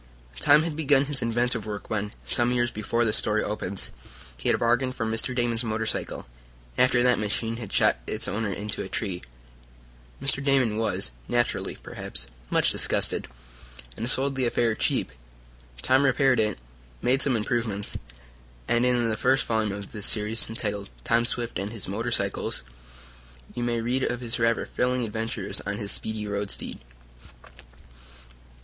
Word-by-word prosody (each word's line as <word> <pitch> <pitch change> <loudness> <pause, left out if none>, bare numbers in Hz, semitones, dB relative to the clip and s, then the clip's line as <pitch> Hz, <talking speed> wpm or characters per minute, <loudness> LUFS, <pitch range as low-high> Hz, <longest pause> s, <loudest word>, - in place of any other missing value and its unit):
Tom 150 - +6
had 165 -2 -3
begun 145 -3 +4
his 140 -2 -1
inventive 120 -1 0
work 105 -1 -5
when, 105 -1 -1
some 120 0 +2
years 120 -1 +1
before 115 +3 0
this 105 - +3
story 110 0 +2
opens, 100 -2 -3 0.4
he 60 - -2
had - - +4
bargained 125 +2 +2
for 115 - -2
Mr. 115 +3 0
Damon's 120 -1 +1
motorcycle, 110 - -1 0.5
after 125 -1 +4
that 125 -1 +4
machine 115 +2 -1
had 115 -5 -7
shot - - +4
its - - -1
owner 105 +1 -1
into 105 +2 -4
a 95 - -5
tree. 95 -5 -3 1.0
Mr. 135 0 -1
Damon 130 -6 +3
was, 110 - -1 0.2
naturally, 120 0 0
perhaps, - - -5 0.2
much - - +4
disgusted, - - +2 0.7
and 115 +3 -3
sold 135 +2 +1
the 130 -2 +1
affair 120 -1 +2
cheap. 110 - 0 0.7
Tom 130 +2 +4
repaired 135 -2 +4
it, 105 -2 +1 0.5
made 130 +2 +3
some 135 -4 +2
improvements, 110 -2 0 0.7
and, 120 +1 +3
in 120 -2 +2
the 110 - 0
first 130 +3 +3
volume 110 -2 +1
of 100 0 -7
this 105 -3 -1
series, 110 +1 +1
entitled 105 -3 -3
"Tom 115 0 +2
Swift 120 -4 -3
and 100 +2 -3
His 110 -4 -6
Motor 110 +5 -2
cycle," 100 -5 0 1.0
you 120 - -4
may 120 -1 0
read 125 +3 0
of 125 -1 0
his 120 -1 -2
rather 115 0 +2
thrilling 125 -1 0
adventures 110 -2 -3
on 100 +1 -3
his 100 -2 -4
speedy 110 -1 -2
road 100 0 -2
steed. - - -1
115 Hz, 160 wpm, -26 LUFS, 105-125 Hz, 1.0 s, Tom